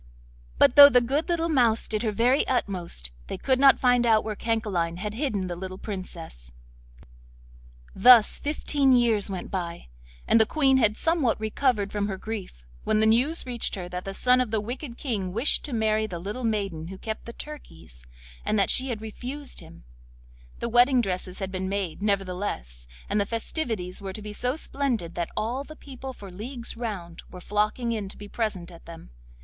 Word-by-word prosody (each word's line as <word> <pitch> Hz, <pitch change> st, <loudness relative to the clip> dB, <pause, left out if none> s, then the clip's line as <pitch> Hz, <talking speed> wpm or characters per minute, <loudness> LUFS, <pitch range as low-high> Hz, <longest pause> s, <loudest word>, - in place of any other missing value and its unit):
But -, -, +5 dB
though 285 Hz, 0 st, +12 dB
the 250 Hz, -3 st, +5 dB
good 275 Hz, +8 st, -1 dB
little 335 Hz, -1 st, +1 dB
mouse 240 Hz, -8 st, +2 dB
did 215 Hz, -1 st, -1 dB
her 220 Hz, -, 0 dB
very 245 Hz, +6 st, +2 dB
utmost, 180 Hz, -, -2 dB, 0.2 s
they -, -, -5 dB
could 260 Hz, -1 st, +1 dB
not 275 Hz, 0 st, +6 dB
find 245 Hz, -1 st, +4 dB
out 220 Hz, -2 st, +4 dB
where 215 Hz, -1 st, -4 dB
Cancaline 200 Hz, -7 st, -1 dB
had 210 Hz, +3 st, -4 dB
hidden 220 Hz, -6 st, -1 dB
the 175 Hz, -1 st, -4 dB
little 185 Hz, +1 st, -7 dB
Princess. 170 Hz, -, -8 dB, 1.4 s
Thus 235 Hz, +2 st, +6 dB
fifteen 285 Hz, -2 st, +1 dB
years 230 Hz, -5 st, +2 dB
went 190 Hz, -2 st, -5 dB
by, 170 Hz, -, -5 dB, 0.4 s
and 225 Hz, -, +5 dB
the 220 Hz, -, +5 dB
Queen 270 Hz, -1 st, +3 dB
had 215 Hz, -4 st, +2 dB
somewhat 320 Hz, -10 st, +1 dB
recovered 220 Hz, -1 st, 0 dB
from 205 Hz, -1 st, -1 dB
her 195 Hz, -2 st, -4 dB
grief, 195 Hz, -, -7 dB, 0.2 s
when 215 Hz, -, +1 dB
the 220 Hz, -, +4 dB
news 250 Hz, +9 st, +2 dB
reached 245 Hz, -2 st, 0 dB
her 180 Hz, -3 st, -6 dB
that 180 Hz, 0 st, -5 dB
the 195 Hz, 0 st, -6 dB
son 250 Hz, +3 st, +4 dB
of 250 Hz, -, -1 dB
the 220 Hz, 0 st, 0 dB
wicked 240 Hz, +3 st, -6 dB
King 200 Hz, -9 st, -3 dB
wished 230 Hz, +8 st, +2 dB
to 295 Hz, -, -7 dB
marry 220 Hz, -2 st, +1 dB
the 180 Hz, -, -6 dB
little 205 Hz, +9 st, -5 dB
maiden 195 Hz, -8 st, -2 dB
who 190 Hz, +2 st, -8 dB
kept 220 Hz, +2 st, -6 dB
the 235 Hz, -, -8 dB
turkeys, 80 Hz, -, -11 dB, 0.4 s
and 215 Hz, -, 0 dB
that 195 Hz, -, +3 dB
she 260 Hz, -, +2 dB
had 225 Hz, -3 st, -3 dB
refused 260 Hz, +6 st, -5 dB
him; 85 Hz, -, -14 dB, 0.7 s
the -, -, -3 dB
wedding 245 Hz, +2 st, +5 dB
dresses 185 Hz, -2 st, -3 dB
had 190 Hz, -1 st, -4 dB
been 190 Hz, 0 st, -3 dB
made, 195 Hz, -3 st, -3 dB
nevertheless, 185 Hz, -, -3 dB, 0.2 s
and 210 Hz, -, +1 dB
the -, -, +3 dB
festivities 225 Hz, -, -3 dB
were 195 Hz, -1 st, -5 dB
to 215 Hz, -, -8 dB
be 210 Hz, 0 st, -6 dB
so 250 Hz, +5 st, -1 dB
splendid 255 Hz, -, -2 dB
that 170 Hz, -1 st, -3 dB
all 245 Hz, +5 st, -1 dB
the 310 Hz, +2 st, -12 dB
people 265 Hz, -3 st, -9 dB
for 200 Hz, -6 st, -11 dB
leagues 235 Hz, +6 st, -6 dB
round 200 Hz, -8 st, -6 dB
were 180 Hz, -, -10 dB
flocking 210 Hz, +5 st, -1 dB
in 210 Hz, -4 st, -3 dB
to -, -, -8 dB
be 205 Hz, -, -9 dB
present 205 Hz, -6 st, -3 dB
at 170 Hz, -, -14 dB
them. 165 Hz, -, -11 dB
215 Hz, 190 wpm, -26 LUFS, 190-250 Hz, 1.4 s, though